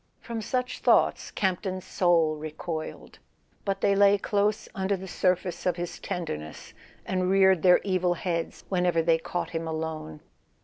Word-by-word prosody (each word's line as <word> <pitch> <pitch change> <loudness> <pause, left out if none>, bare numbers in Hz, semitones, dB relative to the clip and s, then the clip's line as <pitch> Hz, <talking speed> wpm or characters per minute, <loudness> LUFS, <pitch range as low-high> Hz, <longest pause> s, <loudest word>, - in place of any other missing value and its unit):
From 230 -1 -5
such 250 +3 -2
thoughts - - +3
Campton's 185 -1 -2
soul 165 -4 +2
recoiled; 155 +1 -6 0.4
but 195 -1 -2
they 200 - +3
lay 200 0 +5
close 205 +1 0
under 195 0 -1
the 190 +1 -8
surface 180 -1 0
of 180 - +2
his 175 0 -5
tenderness, 80 - -5 0.3
and 185 -1 0
reared 190 -2 +5
their 180 +1 +7
evil 185 -2 +1
heads 170 -1 -3
whenever 180 -3 +1
they 165 0 +3
caught 175 +2 -4
him 165 0 -3
alone. 160 - -5
180 Hz, 145 wpm, -27 LUFS, 165-195 Hz, 0.4 s, their